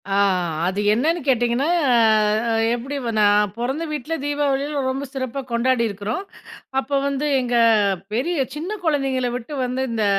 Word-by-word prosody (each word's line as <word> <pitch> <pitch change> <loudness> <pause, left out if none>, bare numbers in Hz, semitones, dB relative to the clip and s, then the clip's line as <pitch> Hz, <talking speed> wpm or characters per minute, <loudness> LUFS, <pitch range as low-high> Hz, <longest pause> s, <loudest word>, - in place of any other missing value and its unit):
ஆ. - - -1 0.5
அது 190 +2 -2
என்னன்னு 315 +10 +1
கேட்டிங்கன்னா 245 +1 +2 0.3
ஆ, - - +5 0.5
அ - - +1 0.2
எப்பிடி 265 +4 -5
வ - - -1
நான் 205 -1 +4
பொறந்த 265 +7 -2
வீட்ல 300 +1 -4
தீபாவளியிலாம் 285 -1 -1
ரொம்ப 270 +2 -4
சிறப்பா 265 0 -3
கொண்டாடியிருக்கிறோம். 235 - 0 0.6
அப்ப 270 0 -6 0.2
வந்து, 280 +1 -1 0.2
எங்க 245 -1 -1 0.6
பெரிய 315 +10 0 0.2
சின்ன 355 +8 -4
குழந்தைங்கள 270 -5 +1
விட்டு 250 +4 -6
வந்து 250 +1 -2
இந்த 220 -2 0
260 Hz, 140 wpm, -21 LUFS, 235-285 Hz, 0.6 s, ஆ